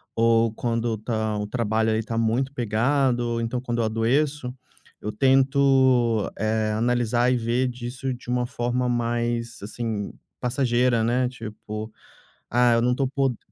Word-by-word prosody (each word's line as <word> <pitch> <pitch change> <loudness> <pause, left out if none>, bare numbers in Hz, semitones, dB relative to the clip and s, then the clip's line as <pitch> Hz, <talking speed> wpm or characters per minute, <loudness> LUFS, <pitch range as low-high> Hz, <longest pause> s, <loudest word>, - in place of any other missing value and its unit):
ou 115 0 +3
quando 115 -1 -1
tá 110 -1 -2
o 105 - -2
trabalho 110 0 0
ali 110 0 +1
tá 115 +1 -4
muito 115 +4 +1
pegado, 120 +2 +1
ou 120 -1 -1
então 120 +2 -2
quando 120 -2 -2
eu - - +1
adoeço, 125 +5 0 0.5
eu 105 - -4
tento, 130 -2 +3
eh, 110 0 0
analisar 120 +1 +1
e 125 - +2
ver 120 +2 0
disso 125 +2 -4
de 125 0 -8
uma 125 0 0
forma 120 +1 -1
mais, 120 0 -1
assim, 110 -1 -4 0.3
passageira, 125 -2 +1
né, 125 +2 +1
tipo: 110 -2 -7 0.6
"Ah, 120 0 +4
eu 115 - +3
não 125 +1 +2
tô 135 0 0
po" 135 -3 0
120 Hz, 150 wpm, -24 LUFS, 115-125 Hz, 0.6 s, Ah